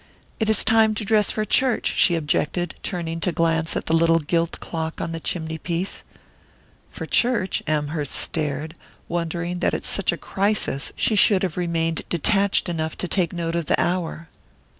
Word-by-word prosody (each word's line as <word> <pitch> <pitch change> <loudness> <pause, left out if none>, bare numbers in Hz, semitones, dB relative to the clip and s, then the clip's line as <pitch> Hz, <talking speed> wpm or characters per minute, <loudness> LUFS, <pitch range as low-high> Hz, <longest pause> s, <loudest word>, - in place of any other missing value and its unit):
"It 220 -1 +1
is 220 - +2
time 220 -1 +4
to 210 - -3
dress 215 -1 +3
for 215 - -1
church," 250 +3 +2
she 175 - +4
objected, 165 +2 -1
turning 165 -3 -3
to 180 - 0
glance 165 -1 +1
at - - -4
the - - -1
little 165 0 +4
gilt 165 +2 -1
clock 160 -1 -4
on 165 - -3
the 165 - -4
chimney 160 -1 -3
piece. 175 +4 -2 0.9
"For - - -7
church?" 235 -6 +1
Amherst 150 -1 -1
stared, 155 0 -2 0.3
wondering 170 +1 -2
that - - +1
at - - -4
such - - +1
a - - -4
crisis 200 -8 -1
she 220 - +1
should 200 -2 +5
have 180 -5 -1
remained 165 -2 -1
detached 195 +4 +2
enough 160 -2 -3
to 180 - -2
take 175 -3 +1
note 170 -2 -3
of 170 -3 -2
the - - +2
hour. 170 -2 -1
170 Hz, 175 wpm, -23 LUFS, 160-190 Hz, 0.9 s, should